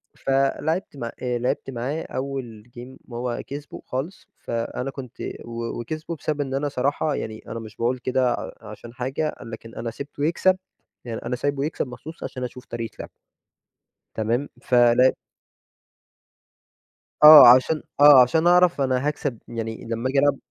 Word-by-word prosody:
فَلعبت 140 +5 -1
مع 120 -3 -5
آآ 125 -1 -1
لعبت 125 +2 -2
معاه 135 +5 -3
أول 130 -5 -5 0.2
game 130 +1 -13
هو 120 0 -3
كسبه 145 +1 -8
خالص، 140 +9 -5
فأنا 115 +3 -4
كنت 130 -3 -10 0.3
و 115 0 -5
وكسبه 155 +7 -5
بسبب 150 -1 -3
إن 135 -2 -4
أنا 145 +2 -1
صراحة 140 +2 -1
يعني 110 0 -6
أنا 115 - -5
مش 110 -1 -10
باقول 120 +2 0
كده 130 -1 +1
ع - - -5
عشان 120 0 -11
حاجة، 135 +5 -3
لكن 115 -1 -10
أنا 115 - -4
سِبته 145 +4 -5
يكسب 185 +3 +2 0.5
يعني 115 -2 -5
أنا 125 +1 -1
سايبه 140 +2 -1
يكسب 155 - -3
مخصوص 140 +7 -10
عشان 130 - -5
أشوف 125 0 -7
طريقة 115 -2 -6
لعبه. - - -7 1.1
تمام؟ 115 +6 -1
فلع 120 +1 +4 2.1
آه 150 -4 +12
عشان 130 +5 +5 0.2
آه 145 -2 +9
عشان 160 +7 +3
أعرف 180 -4 +4
أنا 130 +1 +1
هاكسب 145 -4 -2
يعني 115 -1 -5
لمّا 115 +3 -2
آجي 135 +1 +2
ألعب 145 -1 +3
130 Hz, 150 wpm, -23 LUFS, 120-145 Hz, 2.1 s, آه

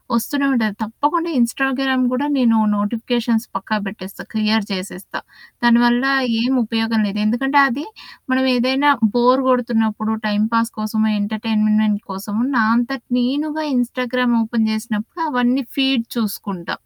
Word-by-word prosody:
ఒస్తూనే 280 +5 -1
ఉంటది. 215 -4 0
తప్పకుండా 300 +10 -1
ఇన్‌స్టాగ్రామ్ 265 +2 +1
గూడా 275 +3 -1
నేను 230 -3 +3 0.2
నోటిఫికేషన్స్ 230 +2 -1
పక్కా 215 +3 -2
బేట్టేస్తా. 195 -1 -8
క్లియర్ 215 -1 +1
జేసేస్తా. 185 0 -6 0.4
దానివల్ల 240 +2 +4 0.4
ఏం 255 +2 +1
ఉపయోగం 225 0 0
లేదు. 205 +1 -4
ఎందుకంటే, 270 +6 +2
అది 280 +5 -4 0.5
మనం 260 0 +2
ఏదైనా 265 +4 +3 0.3
బోర్ 250 +2 +4
గొడుతున్నప్పుడు, 225 -3 0 0.2
టైమ్‌పాస్ 225 +2 +1
కోసము 215 0 0
ఎంటర్‌టైన్మెంట్ 215 0 0
కోసము, 205 +4 -3
నా 225 - +4
అంతటి 245 +1 -2
నేనుగా 300 +5 -1
ఇన్‌స్టాగ్రామ్ 250 0 0
ఓపెన్ 220 -1 0
చేసినప్పుడు, 220 +8 -4
అవన్నీ 250 +1 +1
ఫీడ్ 265 -4 +2
చూసుకుంటా. 200 -5 -4
235 Hz, 120 wpm, -19 LUFS, 215-255 Hz, 0.5 s, దానివల్ల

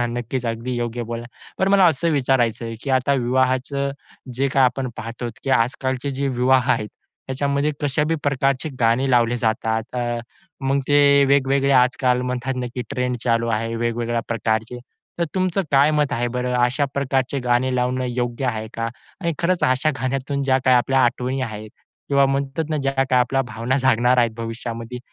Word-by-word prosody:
नक्कीच, 120 +1 -3
अगदी 115 +2 -3
योग्य 120 0 -3
बोललात. 120 +1 -5 0.3
पण 190 - +2
मला 195 -1 +5
असं 165 +1 +1
विचारायचं 125 -5 +1
आहे, 115 0 -5
की 140 - -3
आता 130 +2 +2
विवाहाचं 130 +2 0 0.4
जे 135 +2 +1
काही 135 0 +3
आपण 125 +1 0
पाहतो, 120 +1 -5 0.2
की 135 - -1
आजकालचे 130 +3 0
जे 135 +1 -2
विवाह 130 0 +2
आहेत, 105 - -2 0.4
त्याच्यामध्ये 140 +2 0
कशा 145 +1 +1
बी 165 - +1
प्रकारचे 135 +1 0
गाणे 120 +4 +2
लावले 120 0 +3
जातात, 110 -1 0
अ, 120 -1 -1 0.5
मग 140 - +2
ते 140 -1 +5
वेगवेगळे 140 0 +2
आजकाल 125 0 +1
म्हणतात 125 +1 -2
ना, 125 -1 -2
की 125 - -3
ट्रेंड 125 -2 -1
चालू 115 -1 +1
आहे, 115 +1 -1
वेगवेगळ्या 115 0 -1
प्रकारचे. 115 +1 -1 0.4
तर 170 - +2
तुमचं 185 +1 +1
काय 140 +3 +5
मत 150 -2 +1
आहे 120 +1 0
बरं? 125 0 -1
अशाप्रकारचे 135 0 -1
गाणे 125 +1 +1
लावणं 125 +1 0
योग्य 120 +1 -2
आहे 110 -2 -2
का? 115 0 -2 0.3
आणि 170 -2 0
खरंच, 175 +1 +1
अशा 130 +4 +2
गाण्यातून 135 +2 -2
ज्या 130 -1 +2
काही 130 -1 +5
आपल्या 135 +2 +2
आठवणी 125 +2 -1
आहेत 110 -2 -6 0.4
किंवा 140 -1 +4
म्हणतात 140 +3 -1
ना, 155 - 0
ज्या 135 0 0
काही 130 -1 +2
आपल्या 135 +2 +1
भावना 115 +4 -1
जागणार 125 -1 +3
आहेत 120 -2 +3
भविष्यामध्ये, 115 +1 -5
130 Hz, 170 wpm, -21 LUFS, 120-140 Hz, 0.5 s, मला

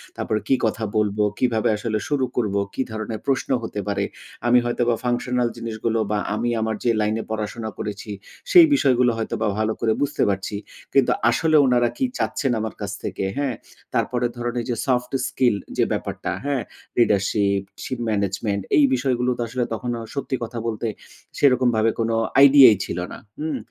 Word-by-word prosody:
তারপরে 110 -1 -1
কি 135 - +4
কথা 110 +1 -1
বলবো? 105 0 +1 0.2
কিভাবে 115 -4 +2
আসলে 110 0 -2
শুরু 140 -3 +1
করবো? 100 -4 0
কি - - -2
ধরনের 110 0 -4
প্রশ্ন 135 -1 0
হতে 110 -2 -4
পারে? 100 - 0 0.4
আমি 125 +1 +6
হয়তো 120 0 -1
বা 115 - +3
ফাংশনাল 125 0 0
জিনিসগুলো 115 0 -2
বা 105 - +1 0.2
আমি 115 +3 -1
আমার 110 0 -1
যে, 120 - +2
লাইনে 110 +1 0
পড়াশোনা 110 +1 -3
করেছি। 105 +1 -5 0.4
সেই 350 -4 +10
বিষয়গুলো 125 - +3
হয়তোবা 110 0 -2
ভালো 110 0 +1
করে 110 -1 +2
বুঝতে 145 0 +1
পারছি। 100 +1 -2 0.4
কিন্তু 135 -2 +4 0.2
আসলে 155 +6 +2
উনারা 120 -2 +3
কি 265 - +1
চাচ্ছেন, 135 -3 -1
আমার 110 0 -3
কাছ 100 - -3
থেকে, - - -3
হ্যাঁ? 140 -4 -1 0.4
তারপরে 125 -1 0
ধরেন, 120 0 -3
এই - - -7
যে, 120 - 0
সফট 125 -1 +1 0.2
স্কিল 125 -5 +2 0.2
যে, - - +4
ব্যাপারটা। - - -3
হ্যাঁ? 140 -3 0 0.3
লিডারশিপ, 100 -3 +2 0.2
শিপ 130 - -4
ম্যানেজমেন্ট 100 0 -1 0.3
এই 150 - +6
বিষয়গুলো 125 -1 0
তো - - -3
আসলে 125 +2 -2
তখনো 120 +1 -3 0.2
সত্যি 140 -1 -2
কথা 115 0 -5
বলতে 115 0 -2 0.5
সেরকমভাবে 120 -5 +3
কোন 115 0 +1 0.3
আইডিয়াই 140 -4 +9
ছিল 85 - -4
না। - - -7 0.2
হুম? 155 +1 -2
120 Hz, 170 wpm, -23 LUFS, 110-125 Hz, 0.5 s, সেই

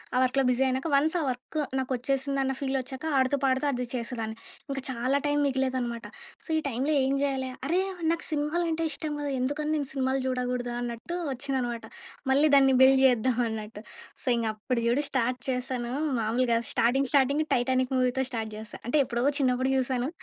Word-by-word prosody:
ఆ - - +3
వర్క్‌లో 265 +1 +2
బిజీ 250 +1 +2
అయినాక, 260 +5 -1
వన్స్ 310 +5 +2
ఆ - - 0
వర్క్ 255 +5 -5 0.2
నాకు 260 0 -3
వచ్చేసిందన్న 270 +1 0
ఫీల్ 270 -1 -1
వచ్చాక, 260 +3 -6
ఆడుతూ 260 +2 +3
పాడుతూ 265 +2 +2
అది 250 -1 -2
చేసేదాన్ని. 230 -2 -3 0.4
ఇంకా 270 -1 -2
చాలా 255 +3 0
టైం 290 0 +1
మిగిలేదనమాట. 260 -3 -1 0.4
సో - - -17
ఈ - - +3
టైంలో 270 +5 0
ఏం 270 - +1
జేయాలా? 265 -2 -1 0.2
అరే! 355 +4 +2 0.3
నాకు 335 - -2
సినిమాలంటే 325 +2 0
ఇష్టం 305 +1 -4
గదా! 285 -1 -2
ఎందుకని 295 +4 -1
నేను 280 -2 -2
సినిమాలు 265 0 0
చూడకూడదా? 250 -1 -2
అన్నట్టు 240 +9 -4
వచ్చిందనమాట. 255 -3 -2 0.5
మళ్ళీ 295 +3 +5
దాన్ని 270 -1 +6
బిల్డ్ 265 0 +7
జేద్దాం 250 0 +3
అన్నట్టు. 215 -1 -6 0.4
సో - - +1
ఇంగ 230 - -1
అప్పుడు 235 +3 -2
చూడు 255 +5 +2
స్టార్ట్ 250 -1 0
చేశాను, 250 -1 -2 0.3
మామూలుగా 230 +1 +1
స్టార్టింగ్ 255 +3 +2
స్టార్టింగ్ 280 +2 +3
టైటానిక్ 255 +1 +1
మూవీతో 255 +1 +1
స్టార్ట్ 220 -2 -3
చేశా. 215 0 -8
అంటే 295 +4 +2
ఎప్పుడో 240 0 -1
చిన్నప్పుడు 260 0 +2
జుసాను. 255 +1 0
260 Hz, 170 wpm, -28 LUFS, 245-275 Hz, 0.5 s, బిల్డ్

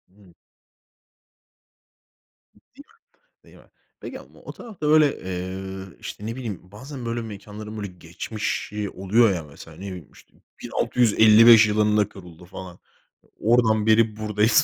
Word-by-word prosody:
Hımm. 100 -4 -21 2.2
Değil 255 - -18 0.4
mi, - - -47
değil - - -19
mi? - - -21 0.3
Peki - - -7
ama - - -17
o - - -9
tarafta 210 -11 -7
böyle, 150 -2 +4
eee, 95 +1 -6
işte 105 - -8
ne 115 +1 -4
bileyim, 115 -8 -5
bazen 130 +4 -9
böyle 115 0 -2
mekânların 105 0 -9
böyle 105 -1 -4
geçmişi 100 +3 -5
oluyor 100 +4 +2
ya, 85 -3 -4
mesela 75 +2 -14
ne - - -13
bileyim 90 -6 -9
işte - - -20 0.3
1655 115 -1 +6
yılında 105 -1 +2
kuruldu 90 -3 -13
falan. 90 0 -10 0.6
Oradan 110 -2 +3
beri 110 -1 +3
buradayız 110 +6 +3
105 Hz, 130 wpm, -23 LUFS, 95-115 Hz, 2.2 s, 1655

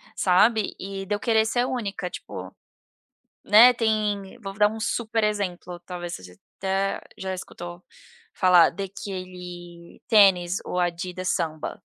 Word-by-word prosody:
sabe, 210 +4 +3
e 195 0 -6
de 205 - -2
eu - - -5
querer 220 -1 +2
ser 245 +2 +1
única 205 -8 -3
tipo, - - -9 0.9
né, 230 +4 +8
tem 215 -4 -1
vou 195 -3 -7
dar 210 +1 +4
um 220 +1 -7
super 225 0 -1
exemplo 180 -4 -2
talvez 175 -1 -6
você 90 -1 -13 0.2
até 195 +1 -1 0.2
já 190 0 -4
escutou 175 -1 -8 0.5
falar 180 -3 +6
daquele 180 -2 -8
tênis 190 -5 +5
o - - -4
Adidas 180 +1 -2
Samba. 155 -3 -3
190 Hz, 130 wpm, -25 LUFS, 180-210 Hz, 0.9 s, né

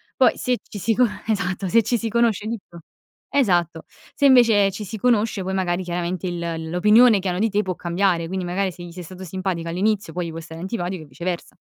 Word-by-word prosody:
Poi - - +4
se 250 -1 0
ci 205 - -10
si 225 +4 +1
con 250 -1 +4 0.2
esatto, 195 -3 -1
se 230 +5 +4
ci 240 +3 +1
si 225 - -3
conosce 230 -2 +1
dico 195 -6 -7 0.5
esatto, 175 - +1 0.3
se 285 - +1
invece 225 -7 +6
ci 205 +2 -6
si 220 +3 -6
conosce, 220 -3 +1
poi 190 +1 -3
magari 185 -1 0
chiaramente 175 +1 -3
il 170 -2 -4
l'opinione 210 +5 +5
che 190 - -4
hanno 180 0 -1
di 225 +2 +2
te 210 +1 +1
può 185 -2 -3
cambiare, 175 -1 0
quindi 185 0 -3
magari 185 +2 -1
se 175 - -13
gli 175 - -9
sei 180 0 -8
stato 185 +2 -10
simpatico 185 -1 -3
all'inizio 195 0 0
poi 180 -1 -3
gli - - -5
può 165 - -6
stare 160 0 -9
antipatico 180 -3 -4
e - - -13
viceversa. 170 +6 -5
190 Hz, 220 wpm, -22 LUFS, 175-215 Hz, 0.5 s, invece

